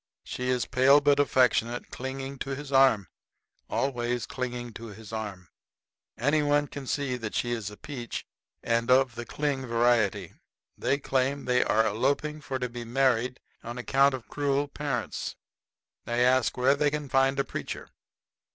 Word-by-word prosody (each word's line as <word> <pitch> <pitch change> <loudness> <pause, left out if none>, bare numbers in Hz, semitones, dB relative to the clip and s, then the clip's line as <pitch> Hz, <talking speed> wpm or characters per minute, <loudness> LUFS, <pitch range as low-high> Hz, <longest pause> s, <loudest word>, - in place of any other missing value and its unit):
She 125 0 -4
is 125 -2 +1
pale 135 +3 +5
but 145 0 +3
affectionate, 125 -3 +2
clinging 135 +1 -5
to 135 0 -3
his 145 0 -8
arm 130 -8 +5 0.6
always 120 -3 -1
clinging 120 -2 -5
to 115 +2 -8
his 110 +1 -11
arm. 100 -5 -5 0.7
Any 145 +6 +2
one 145 0 +2
can 140 -2 -8
see 135 -3 -1
that 115 -3 -5
she 120 - 0
is 110 -4 -2
a 105 - -12
peach 125 -6 -6 0.4
and 115 +1 0
of 130 -1 +5
the 120 0 -7
cling 140 -3 -2
variety. 115 -3 +2 0.4
They 140 - 0
claim 135 0 0
they 125 0 +3
are 110 +1 +3
eloping 140 +8 0
for 135 -2 -3
to 125 -1 -2
be 120 0 -7
married 125 0 +1 0.2
on 120 +1 -6
account 135 +2 +3
of 125 - -10
cruel 145 0 0
parents. 140 -4 -3 0.7
They 120 +1 +2
ask 130 0 +2
where 130 +2 +4
they 145 +1 +2
can 150 0 -3
find 135 0 +2
a - - +3
preacher. - - -6
130 Hz, 160 wpm, -28 LUFS, 120-140 Hz, 0.7 s, pale